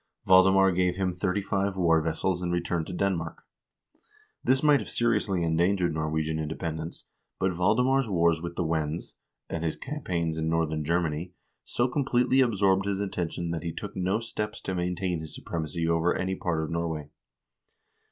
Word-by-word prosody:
Valdemar 95 +1 +6
gave 90 0 +1
them 95 -2 0
thirty 95 +2 -1
five 100 -1 -1
war 85 -3 +4
vessels 85 +3 -1
and 90 -1 -1
returned 85 -1 -1
to - - -6
Denmark. 90 -3 -2 1.0
This 135 +2 +2
might 150 -2 +6
have - - -7
seri 120 0 +2
ously 95 -5 -1
endangered 85 +2 +2
Norwegian 80 0 -1
independence, 80 +1 -4 0.3
but 95 -1 +1
Valdemar's 120 +8 +2
wars 85 -3 +2
with 85 0 -5
the 90 - 0
Wends, 80 0 -2 0.3
and 85 - -4
his 80 - -1
campaigns 85 - -3
in 80 0 0
northern 80 -2 0
Germany, 85 +1 -1 0.3
so 120 - 0
com 140 +3 -1
pletely 130 +1 +3
absorbed 100 -4 +2
his 100 -1 -1
attention 85 -3 -3
that 85 - -2
he 85 - -3
took - - -7
no 95 +2 +1
steps 105 -2 -4
to 95 - -3
maintain 90 0 -1
his 80 -1 -8
supremacy 80 0 -3
over 85 +1 +2
any 95 0 -1
part 85 -4 -1
of 80 - -5
Norway. 80 -3 -3
90 Hz, 170 wpm, -28 LUFS, 80-95 Hz, 1.0 s, Valdemar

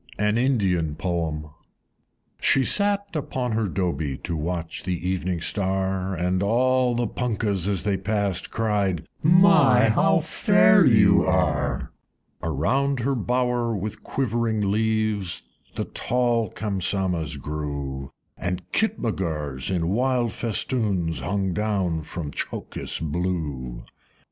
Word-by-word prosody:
An 105 +1 +1
Indian 95 - +1
Poem. 80 -3 -2
I. - - -14 0.9
She 135 - +3
sate 200 -2 +1
upon 130 -4 -2
her 110 -1 0
Dobie, 80 -7 -2
To 85 - -3
watch 85 +1 -3
the 90 -1 -2
Evening 90 -2 -1
Star, 95 0 0
And 90 +2 0
all 125 +4 +2
the 120 0 0
Punkahs, 105 -5 -1
as 100 -3 0
they 100 -2 0
passed, 100 -2 -1
Cried, 105 -6 0 0.2
"My! 150 - +6
how 110 - +3
fair - - +5
you - - +5
are!" - - 0 0.5
Around 125 - 0
her 135 +4 0
bower, 125 -1 0
with 105 +2 -5
quivering 115 -5 -1
leaves, 110 -3 0 0.3
The - - -2
tall 120 -3 0
Kamsamahs 95 -7 -1
grew, 70 -2 -5 0.3
And 90 +1 -3
Kitmutgars 80 - -1
in 85 -3 0
wild 120 +2 +1
festoons 105 - -1
Hung 95 -1 -1
down 95 -5 -1
from 75 -1 -6
Tchokis - - -4
blue. 75 -6 -3
II. - - -17
100 Hz, 120 wpm, -24 LUFS, 85-115 Hz, 0.9 s, My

